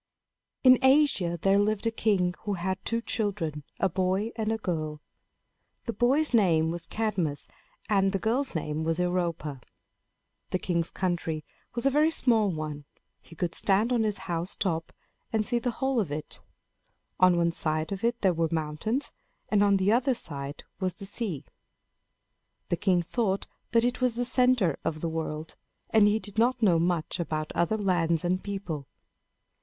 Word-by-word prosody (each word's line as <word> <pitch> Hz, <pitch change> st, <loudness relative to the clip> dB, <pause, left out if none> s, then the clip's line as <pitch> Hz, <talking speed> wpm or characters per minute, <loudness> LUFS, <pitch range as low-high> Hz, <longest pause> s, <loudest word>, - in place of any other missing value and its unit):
In 255 Hz, -1 st, +8 dB
Asia 265 Hz, -, +3 dB
there 195 Hz, +3 st, +3 dB
lived 210 Hz, +1 st, +1 dB
a 230 Hz, -, +2 dB
king 195 Hz, -5 st, +1 dB
who 205 Hz, -, -3 dB
had 190 Hz, +1 st, -3 dB
two 230 Hz, 0 st, -1 dB
children, 190 Hz, -11 st, -2 dB, 0.2 s
a 195 Hz, -, +3 dB
boy 190 Hz, +4 st, 0 dB
and 220 Hz, -1 st, -1 dB
a 225 Hz, -, 0 dB
girl. 155 Hz, -7 st, -3 dB, 0.9 s
The 230 Hz, -, -2 dB
boy's 260 Hz, +7 st, +3 dB
name 165 Hz, -8 st, +4 dB
was 170 Hz, 0 st, -5 dB
Cadmus, 190 Hz, -10 st, -2 dB, 0.4 s
and 195 Hz, -3 st, +3 dB
the 195 Hz, -, 0 dB
girl's 235 Hz, +5 st, -1 dB
name 155 Hz, 0 st, -2 dB
was 165 Hz, 0 st, 0 dB
Europa. 170 Hz, -6 st, -1 dB, 0.9 s
The -, -, 0 dB
king's 170 Hz, -2 st, -1 dB
country 170 Hz, -4 st, -2 dB, 0.3 s
was 240 Hz, -, -1 dB
a 275 Hz, -, +4 dB
very 300 Hz, +3 st, +4 dB
small 230 Hz, -9 st, +3 dB
one. 155 Hz, -3 st, -5 dB, 0.4 s
He 165 Hz, -, -15 dB
could 170 Hz, +1 st, -2 dB
stand 210 Hz, +5 st, +3 dB
on 240 Hz, -, +2 dB
his 215 Hz, -2 st, 0 dB
house 170 Hz, 0 st, -2 dB
top 165 Hz, -4 st, -2 dB, 0.4 s
and 220 Hz, -1 st, +1 dB
see 240 Hz, +1 st, +1 dB
the 245 Hz, -, -1 dB
whole 265 Hz, +1 st, 0 dB
of 185 Hz, -9 st, -1 dB
it. 150 Hz, +1 st, -6 dB, 0.8 s
On 185 Hz, -1 st, +5 dB
one 170 Hz, 0 st, +2 dB
side 155 Hz, 0 st, -1 dB
of 195 Hz, +1 st, -4 dB
it 235 Hz, +1 st, 0 dB
there 190 Hz, -3 st, +3 dB
were 165 Hz, -1 st, 0 dB
mountains, 165 Hz, -, -2 dB, 0.4 s
and 205 Hz, -1 st, +4 dB
on 200 Hz, -1 st, +4 dB
the 190 Hz, +2 st, +2 dB
other 250 Hz, +3 st, +3 dB
side 140 Hz, -8 st, -4 dB, 0.2 s
was 185 Hz, -2 st, -1 dB
the 200 Hz, -, -8 dB
sea. 195 Hz, -, -4 dB, 1.2 s
The -, -, +2 dB
king 185 Hz, -3 st, +2 dB
thought 200 Hz, +1 st, -1 dB, 0.2 s
that 230 Hz, -1 st, +3 dB
it 245 Hz, +1 st, -1 dB
was 250 Hz, -2 st, +2 dB
the 245 Hz, +1 st, -1 dB
center 250 Hz, -, +2 dB
of 155 Hz, -1 st, -2 dB
the 165 Hz, -, -1 dB
world, 160 Hz, -1 st, -4 dB, 0.4 s
and 215 Hz, -2 st, +6 dB
he 210 Hz, +1 st, +3 dB
did 215 Hz, -1 st, -5 dB
not 245 Hz, +1 st, +2 dB
know 175 Hz, -6 st, +5 dB
much 170 Hz, 0 st, -1 dB
about 155 Hz, -2 st, -2 dB
other 170 Hz, +6 st, +1 dB
lands 175 Hz, -5 st, +1 dB
and 185 Hz, +1 st, 0 dB
people. 180 Hz, -9 st, -5 dB
190 Hz, 170 wpm, -28 LUFS, 165-225 Hz, 1.2 s, In